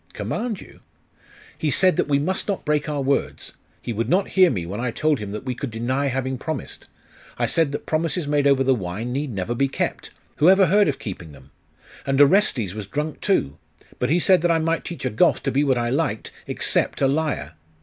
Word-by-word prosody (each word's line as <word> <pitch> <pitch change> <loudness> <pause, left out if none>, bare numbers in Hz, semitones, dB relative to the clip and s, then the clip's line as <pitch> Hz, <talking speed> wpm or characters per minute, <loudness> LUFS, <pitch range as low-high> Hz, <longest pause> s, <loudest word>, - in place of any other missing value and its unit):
'Command 220 -3 -3
you?' - - -15 0.8
'He 155 - -1
said 185 +3 +3
that - - 0
we 140 -1 +2
must 170 +7 -2
not 200 -2 -2
break 150 0 0
our 145 -2 -2
words. 140 +1 -1 0.3
He 120 - -3
would 115 +2 -2
not 190 +5 +2
hear 185 -2 +5
me, 90 -8 -2
when 100 +5 -5
I 125 +1 -1
told 150 +4 0
him 105 -2 -6
that 105 - -5
we 130 - -3
could 130 +2 -5
deny 125 +5 -1
having 130 -1 -2
promised. 155 -1 -6 0.5
I - - +1
said 160 -4 +1
that 145 - -5
promises 160 0 -1
made 145 -1 +2
over 135 -1 +4
the 135 0 +3
wine 105 +3 -4
need 140 0 -2
never 100 +2 -3
be 135 +3 +1
kept. - - -3 0.3
Who 155 - +5
ever 190 0 +6
heard 200 +3 +4
of 140 -2 -1
keeping 85 -6 -8
them? 65 0 -17 0.5
And 135 0 0
Orestes 140 - +4
was 105 -2 -6
drunk, 150 +7 -4
too. 75 - 0 0.4
But 125 - 0
he 165 - +3
said 185 0 +4
that 175 - +1
I 165 - +4
might 165 +1 0
teach 170 -5 -6
a 130 - 0
Goth 110 - +2
to - - 0
be 140 +2 +2
what 135 -3 +2
I 120 0 -1
liked, - - -1 0.2
except - - -1
a - - +5
liar.... 140 - -1
140 Hz, 220 wpm, -23 LUFS, 120-160 Hz, 0.8 s, ever